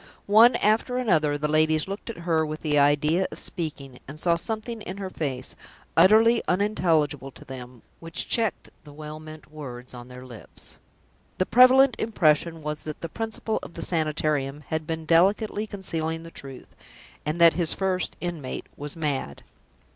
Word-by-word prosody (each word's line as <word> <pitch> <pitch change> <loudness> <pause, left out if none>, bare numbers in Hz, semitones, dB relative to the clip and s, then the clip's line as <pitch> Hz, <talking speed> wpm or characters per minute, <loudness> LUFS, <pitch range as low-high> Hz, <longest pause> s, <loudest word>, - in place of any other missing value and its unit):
One 225 +4 +6
after 225 +4 +1
another 160 -12 +2
the 150 +1 -1
ladies 155 +1 +2
looked 195 +4 -6
at 230 - -6
her 160 -2 +2
with 155 0 -5
the 150 -2 +1
idea 150 +5 +3
of - - -8
speaking, 145 -7 -5
and 145 +3 -9
saw 170 +1 +3
something 220 +5 -4
in 190 -1 -7
her 190 -2 -5
face, 130 -6 -4 0.4
utterly 225 +4 +6
unintelligible 165 -8 +1
to - - -15
them, 125 -2 -10 0.2
which 165 0 -6
checked 225 -4 -1
the 145 - -13
well 155 +1 -8
meant 155 -1 -12
words 125 -5 -9
on 120 0 -10
their 125 0 -11
lips. 120 -4 -11 0.6
The 185 - +1
prevalent 255 +2 +6
impression 165 -6 +1
was 150 0 -4
that 155 -1 -7
the 165 - -5
Principal 225 +2 -3
of 170 - -11
the 165 - -3
Sanitarium 150 -3 0
had 160 -1 -3
been 160 -1 -4
delicately 205 +6 +2
concealing 165 -5 -2
the 165 - -11
truth, 135 -4 -9 0.5
and 155 +3 -3
that 170 -1 +7
his 170 -3 +2
first 190 -1 -1
inmate 170 -7 -5
was 145 0 -6
mad. 145 - -3
160 Hz, 165 wpm, -25 LUFS, 150-190 Hz, 0.6 s, that